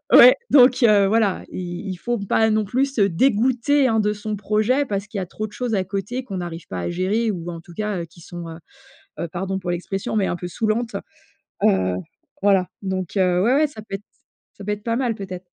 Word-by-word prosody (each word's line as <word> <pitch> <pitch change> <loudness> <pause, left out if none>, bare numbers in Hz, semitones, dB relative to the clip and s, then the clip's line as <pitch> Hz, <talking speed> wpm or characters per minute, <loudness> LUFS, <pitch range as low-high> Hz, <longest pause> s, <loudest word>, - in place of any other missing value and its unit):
Ouais, 250 +1 +10
donc, 255 -2 +6
heu, 205 -3 +6
voilà, 210 -2 +1
i 175 +2 -5
il 185 - -3
faut 240 +6 -2
pas, 220 +2 +2
non 215 0 +2
plus, 265 +6 0
se 230 - 0
dégoûter, 250 - +3
hein, 225 -1 +2
de 210 0 +1
son 210 0 -4
projet, 215 +7 +1
parce 200 -4 -3
qu'il 215 -1 -9
y - - 0
a - - -5
trop 215 +4 -5
de 210 - -15
choses 245 -3 -2
à 190 - +2
côté 195 +7 -4
qu'on 195 -6 -6
n'arrive 175 -2 -6
pas 90 - -5
à - - -2
gérer 200 +6 0
ou, 175 -3 -4
en 170 -1 -7
tout 175 - -14
cas, 210 0 -2
heu, - - -5
qui 170 +1 -17
sont, 170 0 -8
heu 160 - -9 0.6
heu, 170 - -2
pardon 190 +3 -3
pour 180 -2 -3
l'expression, 190 +4 -3
mais 205 -3 +2
un - - -1
peu 175 0 -5
saoulantes. 220 +3 -1 0.7
Heu, 95 -1 +3 0.5
voilà, 195 -2 +3
donc, 190 -1 -3
heu, 180 -1 +3
ouais, 240 +6 +3
ouais, 300 +2 +4
ça 275 -7 -10
peut 205 -2 -8
être 200 - -18 0.5
ça - - -10
peut 210 - -3
être 210 0 -6
pas 230 -1 0
mal, 245 -3 0
peut-être. 185 -2 -7
200 Hz, 235 wpm, -22 LUFS, 180-225 Hz, 0.7 s, Ouais